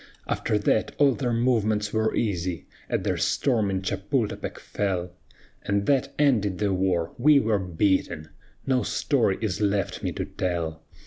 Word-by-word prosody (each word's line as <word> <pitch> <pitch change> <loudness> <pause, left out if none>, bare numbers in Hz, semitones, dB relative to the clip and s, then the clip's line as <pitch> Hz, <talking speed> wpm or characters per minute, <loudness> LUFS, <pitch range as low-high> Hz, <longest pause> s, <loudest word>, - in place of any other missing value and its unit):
"After 105 - 0
that 105 +1 +1
all 140 -2 +5
their 125 -1 -2
movements 110 -3 +1
were 110 0 +1
easy; 90 -5 -1 0.2
At - - -1
their - - 0
storming 100 -7 +1
Chapultepec 100 +4 -2
fell, 90 -3 -2 0.5
And 100 0 0
that 135 -3 +1
ended 110 -10 +2
the 100 -2 0
war 90 -3 0
we 145 +3 +6
were 110 -5 +1
beaten: 90 -3 0 0.4
No 130 -2 +2
story 120 -10 +1
is 105 -3 -2
left 100 -1 0
me - - -2
to - - -3
tell. 85 -3 -3
105 Hz, 145 wpm, -25 LUFS, 95-115 Hz, 0.5 s, we